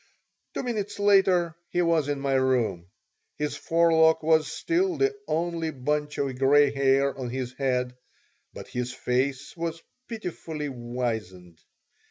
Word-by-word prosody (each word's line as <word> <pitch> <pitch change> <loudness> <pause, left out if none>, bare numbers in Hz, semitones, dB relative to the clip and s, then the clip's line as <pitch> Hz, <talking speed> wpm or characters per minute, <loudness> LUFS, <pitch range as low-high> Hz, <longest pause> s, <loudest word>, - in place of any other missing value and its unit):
Two - - -2
minutes 215 -5 -3
later 190 -5 +3
he 175 0 +1
was 165 -4 +2
in 145 -1 -1
my 135 0 -1
room. 125 -10 +1 0.5
His 150 0 -2
forelock 160 -1 +3
was 160 -1 +3
still 350 - 0
the 410 +1 +1
only 165 0 -1
bunch 150 +1 -2
of 135 -2 -2
gray 140 +1 +5
hair 140 0 +2
on 130 -2 -5
his 130 0 -4
head, 125 -2 -1 0.6
but - - -10
his 125 0 -3
face 130 +2 -2
was 165 -1 -3 0.3
pitifully 165 -9 -5
wizened. 115 -9 -5
145 Hz, 135 wpm, -26 LUFS, 130-165 Hz, 0.6 s, gray